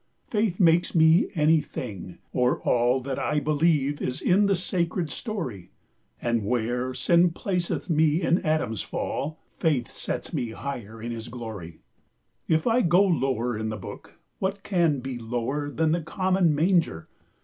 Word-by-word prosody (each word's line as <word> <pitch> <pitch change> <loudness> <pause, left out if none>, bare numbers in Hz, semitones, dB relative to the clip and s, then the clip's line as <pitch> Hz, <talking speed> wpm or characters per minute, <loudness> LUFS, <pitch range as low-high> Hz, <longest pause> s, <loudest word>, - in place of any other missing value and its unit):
Faith 210 -5 0
makes 170 -1 +3
me 160 +3 +5
any 155 0 +4
thing, 100 -10 -7 0.2
or 125 0 +2
all 125 +2 +2
That 135 0 -4
I 150 - +1
beleeve 145 -1 +1
is 125 - -2
in 200 +3 +3
the 195 - +3
sacred 175 -2 -1
storie: 130 - -5 0.5
And 120 -2 0
where 125 +3 -1
sinne 175 +4 +4
placeth 175 +1 -2
me 160 -1 +3
in 170 - +3
Adams 155 - 0
fall, 155 +3 -3 0.2
Faith 140 -8 0
sets - - -5
me 120 - -1
higher 115 -5 -6
in 120 - -3
his 115 0 -6
glorie. 110 -9 -8 0.7
20 - - +3
If - - -14
I 240 +1 +3
go 175 +1 +4
lower 130 - 0
in 110 +1 -3
the 110 - -4
book, 95 - -10 0.2
What 195 +1 -2
can 170 -8 +1
be 130 -1 -5
lower 120 +5 -2
then 155 +2 +1
the 170 +1 +1
common 185 -1 +1
manger? 165 - +1
150 Hz, 160 wpm, -26 LUFS, 120-170 Hz, 0.7 s, me